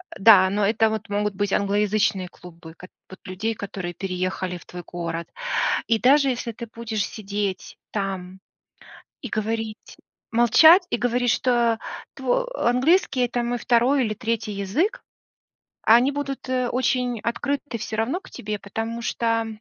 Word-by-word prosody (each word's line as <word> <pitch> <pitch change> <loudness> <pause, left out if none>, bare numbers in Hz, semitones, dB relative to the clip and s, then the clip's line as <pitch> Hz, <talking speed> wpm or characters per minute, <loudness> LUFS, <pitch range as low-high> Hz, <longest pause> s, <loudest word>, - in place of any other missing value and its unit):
э, - - -12
да, 195 -3 +7
но 205 +1 +1
это 220 +2 +3
вот 220 0 -4
могут 205 -1 -1
быть 205 -1 -1
англоязычные 205 -1 +1
клубы 165 -2 -13
кот 180 - -13 0.2
вот 190 - -12
людей, 210 +5 -3
которые 190 -4 -6
переехали 185 0 -3
в - - -16
твой 175 0 -9
город. 170 -1 -5 0.6
И 225 -1 +2
даже 275 +2 +5
если 245 -2 -2
ты 235 +1 -8
будешь 220 -2 -3
сидеть 200 -2 -4
там 190 -2 -4 0.8
и 255 - -6
говорить, 220 0 -4 0.3
молчать 315 - +7
и - - 0
говорить, 245 0 +1
что 235 -2 +2 0.4
тво - - 0 0.2
английский- 260 +2 +2
это 240 0 -2
мой 240 +1 -1
второй 245 +3 +2
или 215 - -2
третий 225 0 -3
язык, 295 - -1 0.8
а 225 - +8
они 260 +4 +3
будут, 275 -2 -5
э, 255 -1 0
очень 250 -1 0
открыты 280 +2 -3
всё 215 0 -5
равно 250 +11 -1
к - - -16
тебе, 210 0 -5
потому 225 +4 -5
что 230 -1 0
225 Hz, 155 wpm, -23 LUFS, 200-245 Hz, 0.8 s, а